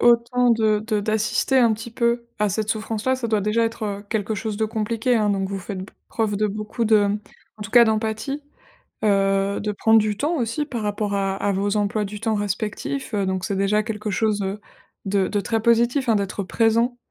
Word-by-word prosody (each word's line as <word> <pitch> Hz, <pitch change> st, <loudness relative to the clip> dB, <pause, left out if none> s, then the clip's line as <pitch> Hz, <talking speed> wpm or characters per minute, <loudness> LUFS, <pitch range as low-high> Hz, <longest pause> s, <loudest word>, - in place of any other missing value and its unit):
autant 240 Hz, +1 st, +4 dB
de 220 Hz, -2 st, +3 dB
de 215 Hz, 0 st, -1 dB
d'assister 220 Hz, +5 st, +1 dB
un 235 Hz, -3 st, +5 dB
petit 220 Hz, +2 st, -6 dB
peu 235 Hz, 0 st, 0 dB
à 210 Hz, -1 st, +2 dB
cette 215 Hz, +2 st, -2 dB
souffrance 220 Hz, 0 st, -2 dB
là, 260 Hz, 0 st, +2 dB
ça 245 Hz, -2 st, -3 dB
doit 220 Hz, -2 st, +1 dB
déjà 210 Hz, +3 st, +1 dB
être, 225 Hz, -1 st, -4 dB
heu, 205 Hz, -1 st, -4 dB
quelque 220 Hz, -1 st, -1 dB
chose 215 Hz, 0 st, -3 dB
de 220 Hz, -, +1 dB
compliqué, 225 Hz, +3 st, 0 dB
hein. 210 Hz, -1 st, +2 dB
Donc, 195 Hz, -1 st, -1 dB
vous 195 Hz, -, -3 dB
faites 190 Hz, +1 st, -6 dB
b 195 Hz, -, -10 dB, 0.2 s
preuve 215 Hz, -3 st, -1 dB
de 215 Hz, +1 st, +1 dB
beaucoup 215 Hz, +3 st, -3 dB
de, 210 Hz, -2 st, +4 dB
mmh, 205 Hz, +1 st, 0 dB, 0.4 s
en 210 Hz, -, -8 dB
tout 220 Hz, -, -7 dB
cas 240 Hz, -1 st, +8 dB
d'empathie, 220 Hz, +5 st, -1 dB, 0.7 s
heu, 195 Hz, -1 st, +2 dB
de 210 Hz, -, -1 dB
prendre 220 Hz, +2 st, +4 dB
du 210 Hz, -1 st, -1 dB
temps 310 Hz, +8 st, 0 dB
aussi 250 Hz, +3 st, -1 dB
par 240 Hz, -6 st, -4 dB
rapport 205 Hz, 0 st, -2 dB
à 195 Hz, -1 st, 0 dB
à 200 Hz, -, 0 dB
vos 200 Hz, +2 st, 0 dB
emplois 210 Hz, +1 st, 0 dB
du 205 Hz, +1 st, -6 dB
temps 225 Hz, -1 st, 0 dB
respectifs, 210 Hz, +6 st, -3 dB
heu, 200 Hz, -2 st, +1 dB
donc 190 Hz, -1 st, -2 dB
c'est 200 Hz, -, -2 dB
déjà 200 Hz, +2 st, +2 dB
quelque 210 Hz, 0 st, -4 dB
chose, 210 Hz, 0 st, +1 dB
heu, 195 Hz, +2 st, -3 dB, 0.5 s
de 195 Hz, -1 st, +1 dB
de 205 Hz, -, 0 dB
très 225 Hz, +2 st, -1 dB
positif, 235 Hz, +3 st, +2 dB
hein, 225 Hz, -, +4 dB
d'être 200 Hz, 0 st, -2 dB
présent, 230 Hz, +4 st, +1 dB
215 Hz, 220 wpm, -23 LUFS, 205-230 Hz, 0.7 s, cas